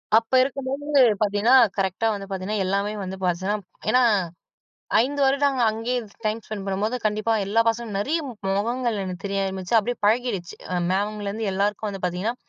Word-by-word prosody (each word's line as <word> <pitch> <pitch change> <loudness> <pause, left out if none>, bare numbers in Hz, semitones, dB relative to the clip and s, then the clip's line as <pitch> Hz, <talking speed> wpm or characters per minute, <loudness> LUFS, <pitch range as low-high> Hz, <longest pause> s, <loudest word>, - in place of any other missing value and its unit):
அப்ப 225 +3 +2
இருக்கும்போது 275 +2 -1 0.2
பார்த்தீங்கன்னா, 210 +4 +3 0.2
கரெக்ட்டா 195 +3 0
வந்து 200 -1 -6
பார்த்தீங்கன்னா, 195 +2 -2
எல்லாமே 200 +2 0
வந்து 190 0 -5
பார்த்தீங்கன்னா 185 +3 0 0.3
ஏனா, 250 +3 +4 1.0
5 285 +4 -1
வருடம் 275 +1 +3
நாங்க 270 -3 0
அங்கேயே 230 +3 -2 0.3
டைம் 215 +1 0
ஸ்பெண்ட் 205 -3 -6
பண்ணும்போது, 200 +5 -1
கண்டிப்பா 215 +2 +1
எல்லா 215 +4 +3
பசங்களும் 225 -3 -1
நெறைய 305 +11 0 0.4
முகங்கள் 235 +2 -1
எனக்கு 180 -2 -6
தெரிய 195 0 -1
ஆரம்பிச்சு 190 +2 -2
அப்படியே 240 +3 -3
பழகிருச்சு 215 -5 0 0.4
மேம்லருந்து 205 +2 -2
எல்லாருக்கும் 205 +2 -1
வந்து 195 -2 -7
பார்த்தீங்கன்னா, 185 +7 -2
215 Hz, 150 wpm, -24 LUFS, 195-240 Hz, 1.0 s, ஏனா